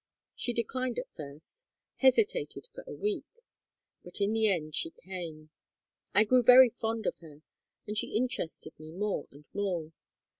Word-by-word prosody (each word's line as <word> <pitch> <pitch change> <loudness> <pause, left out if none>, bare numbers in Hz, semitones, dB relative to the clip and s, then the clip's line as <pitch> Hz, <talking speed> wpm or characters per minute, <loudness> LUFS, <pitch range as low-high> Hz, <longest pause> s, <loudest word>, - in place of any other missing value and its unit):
She 245 - 0
declined 250 +1 -1
at 250 - -5
first, 150 - -4 0.3
hesitated 415 - +2
for - - -9
a - - -7
week; 415 -1 -1 0.8
but 180 - -7
in 200 +2 +2
the 220 -1 +3
end 160 -6 0
she 330 - +1
came. 170 - -8 0.6
I 210 - +7
grew 250 +3 +4
very 250 +1 +9
fond 225 -1 -3
of - - -1
her, 155 -2 -14 0.4
and 210 - -4
she 210 - -1
interested 215 -9 -1
me 155 0 -10
more 205 +4 -2
and 145 +2 -16
more. 180 -6 -2
210 Hz, 155 wpm, -30 LUFS, 160-250 Hz, 0.8 s, very